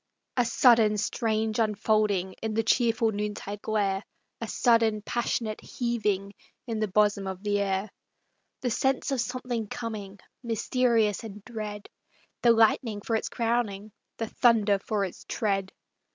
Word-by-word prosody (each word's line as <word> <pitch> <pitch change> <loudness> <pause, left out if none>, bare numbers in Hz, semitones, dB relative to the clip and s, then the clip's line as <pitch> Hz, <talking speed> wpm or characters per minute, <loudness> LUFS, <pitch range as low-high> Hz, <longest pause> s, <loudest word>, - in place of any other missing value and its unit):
SUDDEN 230 -2 +5
Strange 220 +1 0
unfolding 210 -3 +1
In 220 -1 -2
the 225 - +2
cheerful 230 0 +2
noontide 205 -1 -4
glare; 200 -2 0 0.4
A 230 - -3
sudden 225 -2 +2
passionate 230 -2 -2
heaving 210 -5 -2 0.3
In 225 -3 -3
the 215 - +1
bosom 205 0 +2
of 190 +1 -6
the 205 -1 +1
air. 195 0 -1 0.7
The 245 - -1
sense 265 +4 0
of 265 -3 +1
something 245 -2 -3
coming, 210 -4 -6 0.2
Mysterious 230 -2 +1
and 210 -2 -9
dread, 210 -3 -6 0.5
The 240 - +4
lightning 225 -1 +3
for 225 - -1
its 220 - -1
crowning, 225 -3 -1 0.3
The 225 - -2
thunder 215 -4 +3
for 200 0 -1
its 185 - -9
tread. 195 -3 -1
215 Hz, 135 wpm, -27 LUFS, 205-230 Hz, 0.7 s, SUDDEN